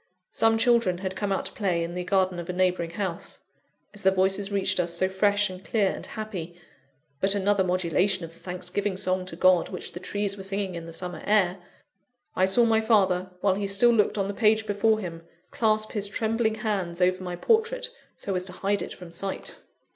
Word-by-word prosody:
Some 225 0 +3
children 230 -6 +3
had 190 0 -4
come 205 0 -2
out 195 - -1
to - - -2
play 180 -5 -1
in 170 +1 -5
the 180 0 -3
garden 185 -1 +1
of 170 +1 -7
a - - -1
neighbouring 180 -2 +1
house. 175 -1 -5 0.5
As 210 - -7
their 190 -1 +4
voices 195 +2 +1
reached 195 -1 +1
us, 170 -1 0
so 185 +2 +2
fresh, 205 +2 +2
and 185 -1 -9
clear, 200 -3 +1
and - - -7
happy 180 -6 -6 0.6
but 195 +4 +4
another 200 0 +2
modulation 185 +1 +1
of 165 - -12
the - - -18
thanksgiving 185 +2 -3
song 185 -1 -1
to 165 - -6
God 185 0 +4
which - - -5
the 175 - -7
trees 205 +1 -2
were - - -7
singing 195 -1 -2
in 170 -1 -7
the - - -8
summer 180 +1 -4
air 195 -3 +3 0.8
I 185 - +3
saw 235 +5 +4
my 220 -1 +3
father, 190 -5 +2
while 200 -2 +3
he 200 +1 -2
still 200 +5 +4
looked 215 -2 +2
on 195 -1 0
the 200 - -3
page 220 0 +3
before 215 +1 +2
him, 170 -5 -6 0.3
clasp 215 -1 +1
his 205 -2 0
trembling 220 +2 0
hands 200 -6 -2
over 185 0 +2
my 180 -1 -4
portrait 455 - +1 0.2
so 195 - -4
as 180 -1 -1
to 185 - -6
hide 200 +2 -1
it - - -6
from 180 -2 -11
sight. 190 +3 -6
195 Hz, 210 wpm, -26 LUFS, 180-210 Hz, 0.8 s, their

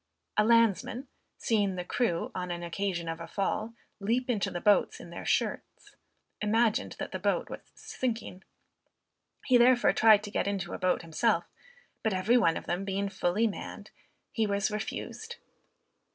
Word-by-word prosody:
A 210 - +4
landsman, 230 +3 +2 0.3
seeing 205 -4 +1
the 180 -1 -4
crew, 180 -5 -1
on 180 -1 -4
an 175 0 -4
occasion 175 0 -2
of 165 0 -4
a 165 - -6
fall, 215 +3 -2 0.2
leap 240 +5 0
into 210 -5 0
the 175 - -4
boats 205 +1 +3
in 175 - -11
their 170 - -7
shirts, - - -2 0.5
imagined 220 +1 +1
that - - -5
the - - -4
ship - - 0
was - - -5 0.2
sinking. 225 -7 -4 1.0
He 255 -2 +5
therefore 245 0 +5
tried 215 -2 +6
to 205 - -7
get - - -1
into 195 -2 -2
a - - -5
boat 185 -1 +1
himself, 170 +3 +1 0.6
but 220 -3 0
every 190 +6 +2
one 165 -10 +4
of - - -7
them 175 +3 -2
being 195 0 -2
fully 195 +4 +1
manned, 215 - -5 0.4
he 225 -2 0
was 200 +1 0
refused. 450 - -5
205 Hz, 165 wpm, -29 LUFS, 180-230 Hz, 1.0 s, tried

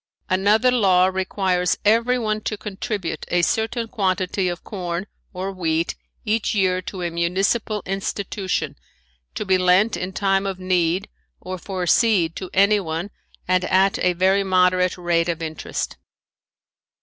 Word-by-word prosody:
Another 210 +6 +4
law 190 -7 +4
requires 185 -1 0
everyone 225 0 +2
to 215 - -3
contribute 205 -2 -4
a 175 0 +1
certain 225 +5 0
quantity 190 -3 0
of 175 -1 -5
corn 180 -2 -4 0.3
or 190 +1 -4
wheat 165 -3 -1 0.3
each 215 0 0
year 185 -2 +2
to 185 0 -6
a 170 - -2
municipal 195 +5 0
institution 195 0 -3 0.6
to 215 - -3
be 190 -1 +3
lent 185 +5 +4
in 180 +1 -4
time 195 0 +1
of 195 -1 -3
need 185 0 0 0.3
or 185 0 -6
for 185 0 -4
seed 175 -4 +3
to 185 - -6
anyone 195 -3 +1 0.4
and 185 0 +2
at 190 +2 +3
a 180 - +3
very 190 +3 +2
moderate 185 -1 +2
rate 175 -1 +1
of 170 - -1
interest. 160 -1 -4
190 Hz, 135 wpm, -22 LUFS, 180-205 Hz, 0.6 s, Another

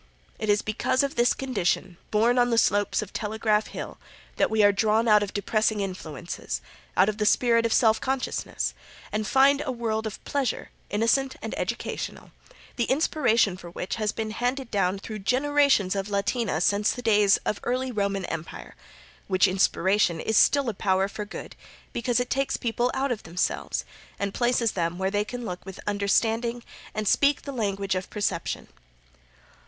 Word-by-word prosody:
It 215 - -3
is 205 0 +3
because 215 +5 +1
of 280 - -1
this 240 +1 +3
condition, 195 -8 -1
born 235 +4 +3
on 245 0 +4
the 230 - +1
slopes 205 0 +2
of 200 - -12
Telegraph 215 0 0
Hill, - - -7 0.4
that - - +3
we 220 -1 +3
are 205 - +7
drawn 215 +3 +2
out 210 -1 +6
of 205 -1 -2
depressing 215 +1 0
influences, 175 -4 -5 0.4
out 185 - +6
of 215 0 -2
the 210 - +1
spirit 230 -1 +3
of - - -6
self 220 -1 +4
consciousness, 265 -1 -2 0.4
and 215 0 -2
find 275 +3 +4
a 280 - -2
world 225 -2 -2
of 215 - -6
pleasure, 275 -5 -2 0.2
innocent 230 +5 +1
and - - -4
educational, - - -4 0.5
the 240 - +1
inspiration 240 - +2
for 175 -2 -10
which 180 +4 -4
has 215 -1 0
been 220 -1 -4
handed 250 +3 -2
down 195 -2 +1
through 215 +2 -7
generations 265 -3 +2
of 195 +1 -2
Latina 200 -2 0
since 205 +3 +2
the 245 - -6
days 210 -3 +5
of 210 - -1
early 255 +1 -1
Roman 200 -3 -1
empire, 165 0 -6 0.5
which 185 -1 +4
inspiration 190 -1 +2
is 220 - -1
still 280 +5 +4
a 230 - 0
power 190 0 +1
for 210 +1 -6
good 205 - -9 0.4
because 240 0 0
it 245 0 -2
takes 275 0 0
people 240 +1 0
out 270 0 0
of 225 - -2
themselves 170 +2 -2 0.3
and 200 -1 -2
places 240 -2 +1
them 170 -1 -2
where 190 +1 -1
they 205 0 +1
can 245 +2 -6
look 180 -3 -5
with 190 -1 -9
understanding 225 +4 0 0.3
and 215 -1 -2
speak 285 +7 +3
the 280 - -5
language 200 -5 -1
of 185 0 -3
perception. 195 -5 -2
215 Hz, 175 wpm, -26 LUFS, 200-245 Hz, 0.5 s, are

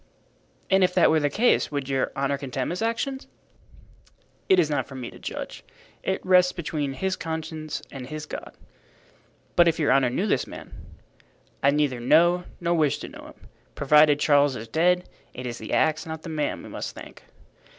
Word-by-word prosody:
"And 190 0 +5
if 180 0 +2
that - - +5
were 160 - +4
the 145 -1 +1
case 220 - +2
would 140 -2 -3
your 135 -1 0
honor 140 +1 0
condemn 135 -1 -3
his 180 - -4
action?" 230 +4 -1 1.3
"It 190 - +6
is 165 - +4
not 145 -1 -1
for 135 - -10
me 125 -2 -6
to - - -14
judge. - - -6 0.4
It 190 - -2
rests 180 -1 +5
between 150 -4 -3
his 190 +7 -1
conscience 160 -2 -5
and 130 -2 -7
his 155 +2 -6
God." - - -8 1.0
"But 175 -1 +6
if 165 - +2
your 150 - +2
honor 135 -2 +4
knew 155 +11 -1
this 215 - 0
man?" - - -10 0.9
"I 140 - +4
neither 140 -3 +1
know 175 +8 +4
nor 170 0 0
wish 155 -4 +2
to - - -8
know - - -11
him. - - -16 0.3
Provided 150 +1 +5
Charles 145 -2 +4
is 115 -1 -7
dead, 180 +7 +2 0.3
it 125 - -6
is 120 -1 -5
the 110 - -7
axe, 160 +1 +1
not 160 0 -6
the - - -7
man, 155 -2 -2
we - - -10
must - - -6
thank." - - -11
155 Hz, 190 wpm, -25 LUFS, 140-175 Hz, 1.3 s, It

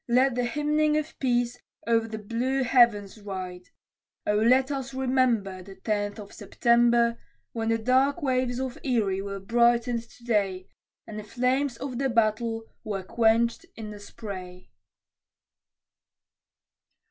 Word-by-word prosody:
Let 255 +2 +4
the 245 0 0
hymning 300 +3 +1
of 305 0 -4
peace 245 -1 0 0.3
o'er 230 -1 +2
the 220 -1 -5
blue 240 +5 -1
heavens 230 -5 +3
ride; 185 -3 -7 0.6
O 210 - +2
let 255 +6 +4
us 270 -1 -4
remember, 250 -8 +1
The 195 +1 -12
Tenth 205 -1 -2
of 205 -2 -10
September, 235 0 +2 0.3
When 225 -1 -2
the 225 - +2
dark 260 +7 +2
waves 255 -2 0
of 260 -2 -4
Erie 210 -7 0
were 200 0 -5
brightened 235 +3 +2
to 240 - -19
day, 200 -5 0 0.4
And 215 -1 -7
the - - -7
flames 250 +4 0
of 255 -2 -5
the 270 -1 +1
Battle 225 0 +1 0.2
were 195 -3 -4
quenched 230 +3 +2
in 215 -2 -7
the 205 - -9
spray. 185 - -9
235 Hz, 135 wpm, -27 LUFS, 210-255 Hz, 0.6 s, Let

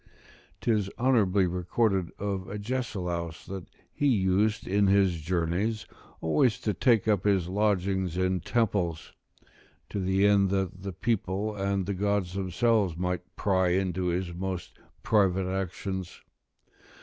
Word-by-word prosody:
'Tis 105 -4 +1
honourably 105 -7 +3
recorded 90 +1 0
of 100 -2 -3
Agesilaus, 100 -7 -3
that 95 -2 -7 0.3
he 145 - +1
used 105 -1 +2
in 100 +1 +3
his 95 -4 +3
journeys 90 +6 -1 0.4
always 80 +9 +2
to 105 - -1
take 115 +1 +3
up 105 -4 +2
his 95 -4 +2
lodgings 95 -2 0
in 95 0 +1
temples, 90 -5 -1 0.8
to 100 - -3
the 95 +1 +2
end 100 -1 +4
that 95 -1 -2
the 100 0 -4
people 105 +1 -1
and 100 -1 -1
the 100 - -2
gods 100 -2 0
themselves 100 -1 +1
might 90 0 -3
pry 95 -2 +2
into 95 0 0
his 90 0 -1
most 95 0 -5 0.2
private 95 -3 +2
actions. 95 0 -4
95 Hz, 125 wpm, -28 LUFS, 90-105 Hz, 0.8 s, end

